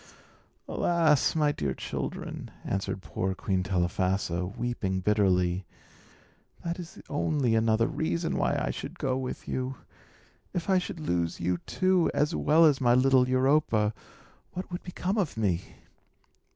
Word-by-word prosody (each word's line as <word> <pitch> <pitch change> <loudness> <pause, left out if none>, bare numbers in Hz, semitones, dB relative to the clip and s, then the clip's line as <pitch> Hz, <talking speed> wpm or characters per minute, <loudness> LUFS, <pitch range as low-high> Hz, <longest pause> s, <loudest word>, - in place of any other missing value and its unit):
"Alas! 165 -5 +2
my 150 -2 +3
dear 70 - -2
children," - - -5
answered 95 -1 -3
poor 95 0 -2
Queen 95 -1 -1
Telephassa, 90 0 0
weeping 105 -6 -1
bitterly, 95 -2 +2 1.0
"that 170 +1 -3
is 175 +1 -9
only 145 -4 +1
another 110 0 +3
reason 165 +4 -1
why - - +1
I - - -1
should - - -7
go 130 -1 0
with 130 -1 -5
you. 130 +1 -2 0.8
If 175 +2 -1
I 190 - +5
should 175 -2 -6
lose 85 - -1
you, 90 0 0
too, 185 -2 +2
as 150 +3 +2
well 160 +2 +5
as 145 -4 +4
my 120 -1 +5
little 130 0 +4
Europa, 130 -5 +3 0.6
what 185 +1 -6
would 175 - -4
become 185 +3 -2
of 175 - -1
me?" 95 -5 -1
125 Hz, 140 wpm, -28 LUFS, 95-160 Hz, 1.0 s, I